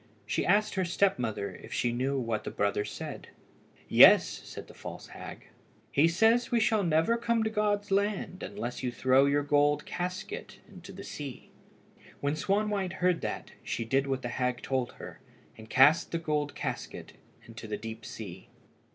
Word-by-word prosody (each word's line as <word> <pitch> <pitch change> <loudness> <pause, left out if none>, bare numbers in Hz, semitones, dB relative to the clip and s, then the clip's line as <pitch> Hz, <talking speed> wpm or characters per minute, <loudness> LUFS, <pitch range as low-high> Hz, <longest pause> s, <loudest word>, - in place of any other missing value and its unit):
She - - -1
asked 210 +1 +3
her 190 - 0
step 185 -1 +2
mother 110 -4 -3
if - - -13
she 120 - 0
knew 130 +3 -1
what 115 -3 -2
her - - -4
brother 100 0 0
said. - - -7 0.6
"Yes," - - +8 0.2
said - - -9
the - - -13
false - - -9
hag; - - -10 0.4
"he 145 +4 +4
says 225 +8 +3
we 240 - +2
shall 220 -1 +3
never 165 +6 +2
come 235 -1 +1
to 220 - -1
God's 205 -2 0
land 200 -2 0
unless 120 +1 -5
you 125 -2 -1
throw 130 +2 +4
your 145 +1 +2
gold 145 0 +2
casket 180 +1 -5
into 185 0 -12
the 195 +1 -9
sea." 145 -8 -8 0.7
When 140 +1 0
Swanwhite 200 +2 0
heard 180 -2 +1
that, - - -4
she 115 - -3
did 135 +4 +1
what 135 -1 -2
the 120 - -3
hag 125 0 -2
told 130 -2 -1
her, - - -10 0.4
and 110 0 -13
cast 145 +5 +5
the 170 - 0
gold 150 -3 -2
casket - - -5 0.3
into 115 -1 -10
the 105 - -3
deep 110 0 -7
sea. 95 -4 -9
150 Hz, 175 wpm, -29 LUFS, 125-195 Hz, 0.7 s, Yes